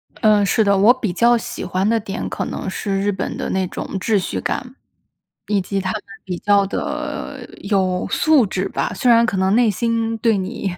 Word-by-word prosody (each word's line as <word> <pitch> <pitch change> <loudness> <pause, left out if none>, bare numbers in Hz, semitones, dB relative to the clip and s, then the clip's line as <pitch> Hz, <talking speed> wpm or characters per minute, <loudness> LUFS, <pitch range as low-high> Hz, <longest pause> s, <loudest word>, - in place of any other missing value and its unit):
呃， 210 -3 +3
是 220 +2 +2
的， 200 -1 +3
我 210 +5 +6
比 230 -8 -3
较 235 +5 +4
喜 225 - -6
欢 190 +2 -1
的 225 +1 +2
点 200 -2 -5
可 - - -3
能 - - -4
是 195 0 -2
日 205 +1 +1
本 190 - -4
的 - - -3
那 190 0 0
种 - - -6
秩 210 +3 +1
序 185 - -3
感， 255 +1 -4 0.7
以 205 -2 +1
及 195 +2 -2
他 185 -1 -2
们 215 - -4 0.2
比 180 -2 -4
较 200 -1 +3
的， 195 - -4
有 190 -3 0
素 310 -6 +4
质 190 0 -2
吧。 - - -2
虽 250 - +1
然 230 0 +5
可 215 -5 -1
能 190 +2 +2
内 240 -1 +4
心 230 +2 -1
对 225 -1 +2
你 190 0 -3
205 Hz, 225 characters per minute, -20 LUFS, 190-230 Hz, 0.7 s, 我